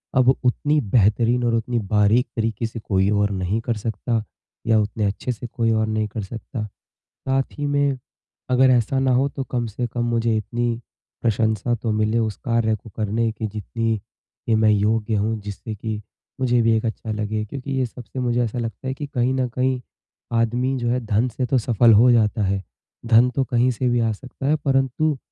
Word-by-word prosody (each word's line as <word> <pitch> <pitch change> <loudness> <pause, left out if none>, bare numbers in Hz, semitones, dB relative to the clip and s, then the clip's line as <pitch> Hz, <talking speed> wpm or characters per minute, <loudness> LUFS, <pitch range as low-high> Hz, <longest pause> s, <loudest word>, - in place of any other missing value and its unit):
अब 130 -1 +5
उतनी 145 +4 +2
बेहतरीन 115 +2 +2
और 120 -1 +1
उतनी 115 +1 -1
बारीक 105 +4 +2
तरीके 115 -1 -1
से 115 +1 -5
कोई 95 -2 +1
और 105 0 +2
नहीं 95 +2 -1
कर 115 0 -1
सकता। 110 +1 -2 0.4
या 115 -1 +4
उतने 105 0 -1
अच्छे-से 115 +4 -3
कोई 115 -2 0
और 110 0 +1
नहीं 110 0 0
कर 105 +1 -5
सकता। 115 +3 -6 0.4
साथ 135 0 -1
ही 145 - -2
में 145 -1 +1 0.5
अगर 130 +1 +5
ऐसा 125 +2 +2
ना 135 -1 +2
हो 130 +3 +3
तो 135 - -4
कम 120 -2 0
से 120 +3 -3
कम 120 +1 -3
मुझे 115 -1 +1
इतनी 120 +2 -2 0.4
प्रशंसा 110 0 +1
तो 115 -1 -2
मिले 110 +2 +1
उस 110 -2 -1
कार्य 115 -3 +1
को 110 +2 -12
करने 110 +1 0
की 110 0 -4
जितनी 110 +2 -2
कि 110 +2 -5
मैं 110 0 +4
योग्य 105 +1 +1
हूँ, 110 +2 0
जिससे 105 +2 -6
कि 105 0 -4 0.4
मुझे 125 -2 +3
भी 115 0 +3
एक 110 - -3
अच्छा 110 0 -3
लगे। 110 0 -2
क्योंकि 135 +5 -7
ये 130 -1 +1
सबसे 125 +2 -8
मुझे 120 -1 +1
ऐसा 120 +1 -3
लगता 115 +2 -5
है 130 - -1
कि 145 +2 -6
कहीं 125 0 +1
न 130 -1 0
कहीं 130 +1 0 0.6
आदमी 125 +3 +1
जो 120 -1 -1
है 125 +1 +1
धन 110 +3 +2
से 125 +1 -2
तो 130 - +1
सफल 115 -1 +4
हो 120 +4 +6
जाता 110 -2 +3
है। 95 0 0 0.4
धन 115 +2 +5
तो 135 - +2
कहीं 125 0 +2
से 125 +1 -1
भी 120 0 +2
आ 115 -1 +2
सकता 130 +4 -6
है, 150 - +4
परंतु 140 +1 +1
115 Hz, 200 wpm, -22 LUFS, 110-125 Hz, 0.6 s, हो